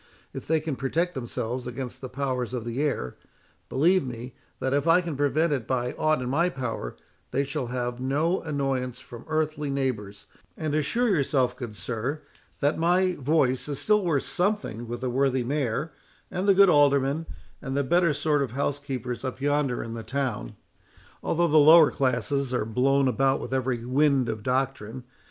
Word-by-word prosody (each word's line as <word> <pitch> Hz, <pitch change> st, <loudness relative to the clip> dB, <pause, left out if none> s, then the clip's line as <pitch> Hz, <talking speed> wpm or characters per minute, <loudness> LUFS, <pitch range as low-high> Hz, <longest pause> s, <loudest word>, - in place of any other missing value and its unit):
If -, -, -7 dB
they 160 Hz, 0 st, +3 dB
can 155 Hz, -2 st, -3 dB
protect 165 Hz, +7 st, -1 dB
themselves 125 Hz, -1 st, -4 dB
against 125 Hz, 0 st, -6 dB
the 130 Hz, -, -6 dB
powers 125 Hz, -2 st, -2 dB
of 120 Hz, -2 st, -4 dB
the 120 Hz, +4 st, -2 dB
air, 135 Hz, -, -2 dB, 0.5 s
believe 175 Hz, +7 st, +3 dB
me, 125 Hz, 0 st, -7 dB, 0.3 s
that 130 Hz, -, -1 dB
if 145 Hz, +2 st, +1 dB
I 165 Hz, +2 st, +6 dB
can 170 Hz, -4 st, -4 dB
prevent 145 Hz, +3 st, +1 dB
it 130 Hz, -6 st, -3 dB
by 125 Hz, -1 st, 0 dB
aught 155 Hz, -4 st, +1 dB
in -, -, -4 dB
my 165 Hz, +8 st, +2 dB
power, 125 Hz, -, -4 dB, 0.3 s
they 140 Hz, -, 0 dB
shall 140 Hz, -2 st, -3 dB
have 125 Hz, 0 st, -3 dB
no 150 Hz, +8 st, 0 dB
annoyance 135 Hz, -5 st, -2 dB
from 120 Hz, -2 st, -11 dB
earthly 155 Hz, -1 st, -1 dB
neighbours; 120 Hz, -8 st, -3 dB, 0.3 s
and 155 Hz, -2 st, -2 dB
assure 230 Hz, +11 st, +1 dB
yourself, 140 Hz, -7 st, +1 dB
good 120 Hz, -5 st, -7 dB
sir, 125 Hz, +8 st, -4 dB, 0.4 s
that 145 Hz, +2 st, +1 dB
my 180 Hz, +2 st, +3 dB
voice 140 Hz, -3 st, +1 dB
is 145 Hz, -, -3 dB
still 210 Hz, +4 st, +2 dB
worth 160 Hz, -6 st, +1 dB
something 180 Hz, -, -1 dB
with 120 Hz, +1 st, -5 dB
the 130 Hz, -, -1 dB
worthy 130 Hz, 0 st, +1 dB
Mayor, 140 Hz, +3 st, -2 dB, 0.4 s
and 185 Hz, +3 st, -2 dB
the 200 Hz, -, +6 dB
good 200 Hz, +1 st, +7 dB
Aldermen, 145 Hz, 0 st, +3 dB, 0.3 s
and 135 Hz, -1 st, -3 dB
the 140 Hz, -, +2 dB
better 170 Hz, +4 st, +3 dB
sort 150 Hz, 0 st, +1 dB
of 130 Hz, -4 st, -2 dB
housekeepers 135 Hz, -3 st, -3 dB
up 130 Hz, -1 st, -4 dB
yonder 145 Hz, -2 st, 0 dB
in 115 Hz, -, -6 dB
the 115 Hz, -, -5 dB
town, 120 Hz, -, -3 dB, 0.7 s
although 170 Hz, +1 st, +1 dB
the 155 Hz, -1 st, +5 dB
lower 155 Hz, +1 st, +8 dB
classes 130 Hz, +1 st, 0 dB
are 105 Hz, -, 0 dB
blown 135 Hz, +4 st, +2 dB
about 135 Hz, +1 st, +2 dB
with -, -, -6 dB
every 125 Hz, -3 st, -1 dB
wind 135 Hz, -1 st, +2 dB
of 110 Hz, -1 st, -3 dB
doctrine. 130 Hz, -1 st, -2 dB
135 Hz, 180 wpm, -26 LUFS, 125-155 Hz, 0.7 s, lower